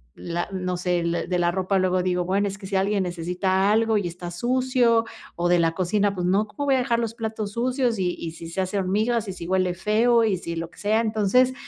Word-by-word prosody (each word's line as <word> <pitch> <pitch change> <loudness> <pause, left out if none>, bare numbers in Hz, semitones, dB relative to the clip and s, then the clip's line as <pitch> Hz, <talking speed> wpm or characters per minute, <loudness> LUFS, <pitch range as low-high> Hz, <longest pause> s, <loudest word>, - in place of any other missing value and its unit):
La 175 +2 -4
no 185 -1 -2
sé, 180 -1 0
l 170 0 -1
de 180 -1 0
la 175 0 +2
ropa 190 +1 0
luego 185 -1 +1
digo: 180 -1 0
"Bueno, 200 +3 +1
es 195 - -7
que 195 -1 -9
si 195 - -3
alguien 195 +1 +1
necesita 180 +3 0
algo 225 0 +3
y 200 - -1
está 175 0 -7
sucio", 240 +2 +2 0.3
o 175 - +1
de 175 -1 +4
la 165 -1 +3
cocina, 200 +3 +1
pues, 180 -1 -1
no, 200 +4 +2
¿cómo 285 +7 -5
voy 275 - +3
a 260 - +2
dejar 240 -2 +1
los 230 -1 -2
platos 220 -2 -4
sucios?, 250 -1 0
y 180 -1 0
y 165 - -4
si 165 0 -9
se 180 - -5
hace 185 +2 -2
hormigas, 215 +4 0
y - - -4
si 170 -2 -8
huele 185 -1 +1
feo, 225 +5 +3
y 210 -3 +1
si 170 -1 -5
lo 165 0 -4
que - - -21
sea. 215 +2 +2
Entonces, 220 +4 +2
195 Hz, 245 wpm, -24 LUFS, 180-225 Hz, 0.3 s, de